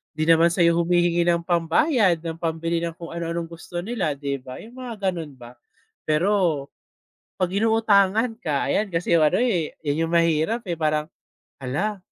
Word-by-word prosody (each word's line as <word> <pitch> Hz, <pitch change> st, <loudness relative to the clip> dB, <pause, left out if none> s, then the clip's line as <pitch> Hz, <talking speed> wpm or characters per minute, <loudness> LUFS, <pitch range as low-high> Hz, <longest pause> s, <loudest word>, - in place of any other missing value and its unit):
Di 155 Hz, -, -1 dB
naman 165 Hz, +1 st, +5 dB
sayo 170 Hz, -1 st, +3 dB
humihingi 175 Hz, 0 st, +2 dB
ng 170 Hz, -1 st, +2 dB
pambayad, 175 Hz, -, +2 dB
ng 165 Hz, 0 st, -5 dB
pambili 165 Hz, 0 st, -1 dB
ng 170 Hz, -1 st, -4 dB
kung 170 Hz, -1 st, -9 dB
ano 170 Hz, 0 st, -4 dB
anong 170 Hz, 0 st, -4 dB
gusto 175 Hz, +1 st, -7 dB
nila, 195 Hz, -9 st, -2 dB
di 140 Hz, -1 st, -4 dB
ba, 130 Hz, 0 st, -10 dB
yung 240 Hz, +3 st, -13 dB
mga 215 Hz, -7 st, -2 dB
ganun 160 Hz, -5 st, -7 dB
ba. 120 Hz, -2 st, -12 dB, 0.6 s
Pero, 165 Hz, -2 st, +1 dB, 0.7 s
pag 180 Hz, -1 st, -1 dB
inuutangan 220 Hz, +1 st, +2 dB
ka 150 Hz, -, -1 dB
ayan 210 Hz, -, +1 dB
kasi 170 Hz, -2 st, +1 dB
ano 155 Hz, -1 st, +3 dB
eh, 180 Hz, -11 st, 0 dB
yan 155 Hz, +2 st, 0 dB
yung 165 Hz, -, -6 dB
mahirap 165 Hz, +7 st, +2 dB
eh, 170 Hz, -4 st, -4 dB
parang, 155 Hz, 0 st, 0 dB, 0.5 s
hala, 195 Hz, +12 st, -2 dB
170 Hz, 170 wpm, -23 LUFS, 160-195 Hz, 0.7 s, naman